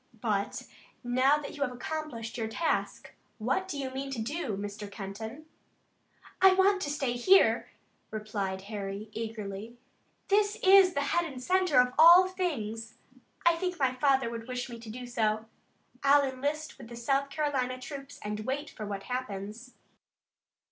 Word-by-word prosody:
But 205 -3 -1 0.4
now 255 +4 +3
that 295 0 -7
you 285 - -9
have 265 -3 +1
accomplished 250 -3 -5
your 225 -2 -2
task, 320 +9 -2 0.2
what 265 - -1
do 300 - -4
you 270 -2 -3
mean 270 +1 -4
to 270 -4 -4
do, 240 - -3
Mr. 205 0 -6
Kenton?" 220 +8 -7 1.0
"I 380 0 +8
want 385 +1 +4
to 290 - -2
stay 275 -4 -1
here," 370 +11 +4 0.4
replied 205 -3 -3
Harry 200 0 -5
eagerly. 220 0 -6 0.5
"This 410 +1 +3
is 380 -1 +7
the 285 - +1
head 335 +3 0
and 260 - -8
center 365 0 +3
of 250 0 +3
all 345 +3 +9
things. 230 - -3 0.5
I 340 0 +6
think 360 +1 -3
my 265 -4 +2
father 270 -1 +2
would 230 0 -6
wish 250 0 -4
me 235 - -8
to 225 -1 -10
do 250 +3 -7
so. 220 -3 0 0.6
I'll 280 +1 +5
enlist 285 +3 -3
with 240 - -10
the 235 - -9
South 275 +4 0
Carolina 275 -4 -1
troops 275 +1 -8
and 210 0 -3
wait 270 +6 -3
for 215 - -7
what 200 -1 -5
happens." 235 -1 -5
255 Hz, 160 wpm, -30 LUFS, 220-295 Hz, 1.0 s, all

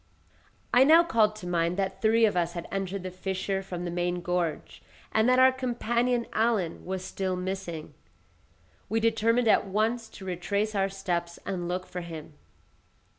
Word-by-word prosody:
I 250 - +7
now 320 +4 +7
called 220 -10 +2
to 185 -4 -8
mind 170 0 0
that 195 -1 -2
three 225 +1 +4
of 210 - +1
us 175 -1 0
had 170 -1 -6
entered 195 -1 -3
the 185 - -5
fissure 190 +1 -2
from 180 -2 -6
the 175 - -3
main 175 0 -1
gorge, 175 -3 -2 0.3
and 220 +2 +3
that 255 - +4
our 260 0 +7
companion, 240 -1 0
Allen, 215 -7 0
was 185 0 -4
still 190 -1 -2
missing; 180 -3 -5 1.0
we 225 - +1
determined 230 +1 +2
at 215 - +4
once 220 +3 0
to 190 - -10
retrace 200 +4 -1
our 195 -1 +1
steps 175 -3 -3
and 175 -3 -3
look 180 +1 -2
for 180 - -6
him. 160 -3 -8
195 Hz, 170 wpm, -28 LUFS, 180-225 Hz, 1.0 s, I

